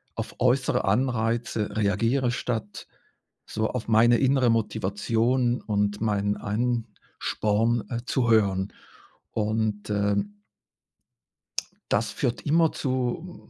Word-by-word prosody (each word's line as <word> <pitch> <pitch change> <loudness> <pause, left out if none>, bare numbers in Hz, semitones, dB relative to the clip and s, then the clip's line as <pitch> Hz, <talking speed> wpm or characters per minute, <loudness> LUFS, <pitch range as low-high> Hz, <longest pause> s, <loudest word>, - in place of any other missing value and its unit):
auf - - -5
äußere 130 +2 +2
Anreize 115 0 0
reagiere, 115 +5 +1
statt 115 -4 -4 0.6
so 110 0 -2
auf 125 -3 -4
meine 115 +2 +5
innere 130 -1 +3
Motivation 115 +3 +1
und 105 -1 -1
meinen 105 -2 0
Ansporn, 115 0 -1
äh, 120 - -2
zu 125 -2 0
hören. 100 -3 +2 0.6
Und, 110 -1 -1
äh 100 -1 +1 1.8
das - - +2
führt 120 - -2
immer 160 +2 +3
zu 130 +7 -3
115 Hz, 100 wpm, -26 LUFS, 105-125 Hz, 1.8 s, meine